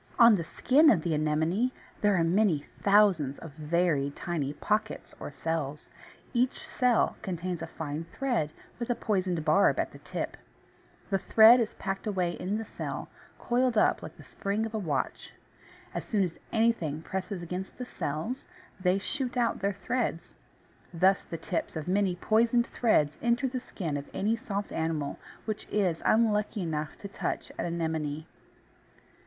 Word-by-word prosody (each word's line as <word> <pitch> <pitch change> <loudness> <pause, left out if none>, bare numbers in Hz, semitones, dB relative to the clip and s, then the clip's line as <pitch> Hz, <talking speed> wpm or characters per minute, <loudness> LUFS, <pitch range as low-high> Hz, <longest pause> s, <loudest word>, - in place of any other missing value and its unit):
On 235 -1 +8
the 180 -5 +1
skin 285 - +4
of 170 - +4
the 170 - 0
Anemone 160 +10 +1 0.3
there 205 -1 +4
are 170 - +3
many 170 -3 +2 0.2
thousands 195 -9 +4
of 165 - -9
very 155 -1 +1
tiny 145 -1 -3
pockets, 210 +7 -2
or - - -5
cells. 150 -1 -3 0.4
Each 245 +1 0
cell 250 -3 +2
contains 180 -1 -3
a - - -4
fine 155 +1 -5
thread 230 - -1 0.3
with 235 - -3
a 245 - +2
poisoned 185 -8 -1
barb 155 +6 +4
at - - -1
the - - -12
tip, - - -4 0.7
The 195 - +2
thread 220 +5 +7
is 225 -3 -1
packed 195 +2 -4
away 185 -4 0
in 185 +4 -2
the 225 - -4
cell, - - -5 0.3
coiled 245 -1 +1
up - - +4
like - - -9
the - - -12
spring 205 +3 -2
of 225 - -6
a 220 - -1
watch. 150 -9 -2 0.6
As - - -3
soon 205 -3 +1
as 175 -3 -4
anything 220 -10 +1
presses 190 0 -4
against 180 +3 -5
the 250 - -5
cells 165 - -3 0.4
they 185 0 +2
shoot 250 +5 -3
out 235 -2 +1
their 200 +1 +1
threads. 195 -2 -2 0.6
Thus 185 +3 +3
the 165 - -7
tips 165 +1 -3
of 155 0 -4
many 190 -1 +2
poisoned 230 +5 +3
threads 155 -14 +2
enter 240 +3 +2
the 255 0 -3
skin 170 - -4
of 140 - -7
any 215 +3 +1
soft 205 -4 -4
animal 160 -3 -2 0.3
which 215 -2 -4
is 185 -6 +1
unlucky 210 -2 +2
enough 155 -2 -3
to 200 - -7
touch 200 - -4
an - - 0
Anemone. 160 -3 -2
190 Hz, 165 wpm, -29 LUFS, 160-220 Hz, 0.7 s, On